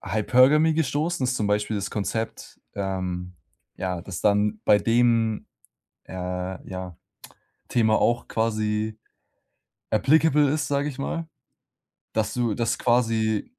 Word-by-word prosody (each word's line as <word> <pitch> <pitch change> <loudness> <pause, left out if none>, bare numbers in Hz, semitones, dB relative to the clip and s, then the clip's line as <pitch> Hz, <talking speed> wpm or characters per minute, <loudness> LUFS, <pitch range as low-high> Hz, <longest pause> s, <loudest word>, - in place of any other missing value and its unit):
Hypergamy 130 - +4
gestoßen, 155 +1 -1
das 125 - +1
ist - - -2
zum 105 - -1
Beispiel 105 +1 0
das 100 -1 -3
Konzept, 110 +2 -4
ähm, 90 -2 -3 0.4
ja, 90 -2 -3
das 90 -4 -6
dann 105 +1 +2
bei 105 - +5
dem, 115 -1 +2 0.6
äh, - - -11
ja, 90 0 -5 0.7
Thema 110 -2 +3
auch 120 0 +1
quasi 110 -1 -1 0.9
applicable 150 +5 +4
ist, 155 +1 0
sage 140 +1 0
ich 140 - -7
mal, 160 +4 -3 0.9
dass 110 -1 0
du 120 -3 0
dass 115 +1 -1
quasi 115 -3 +1
110 Hz, 125 wpm, -25 LUFS, 100-125 Hz, 0.9 s, bei